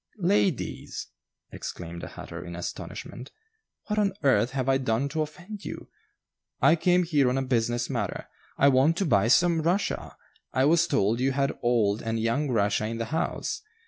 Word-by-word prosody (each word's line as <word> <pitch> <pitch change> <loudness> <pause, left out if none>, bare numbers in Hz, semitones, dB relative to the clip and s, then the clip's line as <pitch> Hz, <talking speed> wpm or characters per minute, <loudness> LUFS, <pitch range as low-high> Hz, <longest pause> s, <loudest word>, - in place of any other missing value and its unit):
"Ladies!" 190 - 0 0.4
exclaimed 85 -1 -7
the - - -6
hatter, - - -8
in 85 -1 -7
astonishment, 120 +8 -7 0.6
"what 210 0 -1
on 200 -2 +2
earth 120 -4 +4
have 130 -1 -2
I 135 0 +3
done 125 +1 0
to 155 +2 -2
offend 180 +7 -7
you? - - -7 0.7
I 140 +5 +5
came 180 +2 +3
here 145 -6 +2
on 125 - 0
a 135 - 0
business 120 -1 0
matter. 115 -8 -3 0.3
I 140 - +5
want 140 +5 +3
to 195 - +1
buy 105 - +3
some 170 +5 +4
Russia. 180 +4 -1 0.4
I 130 +1 +3
was 165 +3 +4
told 115 -4 +1
you 135 +1 +1
had 140 0 0
old 115 -4 +2
and 115 0 -2
young 115 +6 0
Russia 105 -2 +1
in 115 +1 -4
the 115 - -2
house. 160 - -2
135 Hz, 175 wpm, -27 LUFS, 115-165 Hz, 0.7 s, I